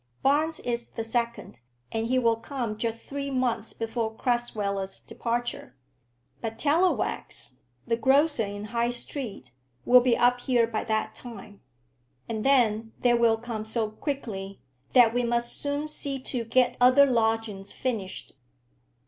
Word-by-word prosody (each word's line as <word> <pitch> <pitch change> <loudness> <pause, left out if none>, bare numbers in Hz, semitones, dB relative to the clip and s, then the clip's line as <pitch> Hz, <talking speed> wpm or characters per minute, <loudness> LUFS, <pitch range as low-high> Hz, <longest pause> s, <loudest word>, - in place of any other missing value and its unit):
"Barnes 305 +4 +2
is 235 -1 -2
the 225 - -5
second, 235 - -2 0.3
and 225 0 -1
he 255 +2 +2
will 230 -2 +3
come 235 -2 -4
just 225 +1 -2
three 280 +3 -5
months 245 -4 -1
before 225 0 -2
Crasweller's 205 -6 -1
departure. 240 +4 -4 0.7
But 225 0 -4
Tallowax, 320 +8 0 0.2
the 230 -1 0
grocer 275 +2 +3
in 205 0 -5
High 235 0 +2
Street, 240 - -6 0.3
will 250 0 +8
be 240 -1 +3
up 245 +1 +4
here 245 -2 +2
by 225 -1 -3
that 220 -1 -1
time. 205 -4 -9 0.7
And 220 -2 -3
then 225 -5 +3
they 245 -1 +4
will 235 -1 +4
come 225 -2 -5
so 220 0 -1
quickly, 215 -7 -5 0.4
that 235 -3 +7
we 245 - +2
must 235 0 0
soon 285 +1 -1
see 285 -2 -2
to 250 -2 -3
get 250 +2 +2
other 255 +3 +7
lodgings 225 -5 0
finished. 220 -7 -4
235 Hz, 140 wpm, -27 LUFS, 225-255 Hz, 0.7 s, will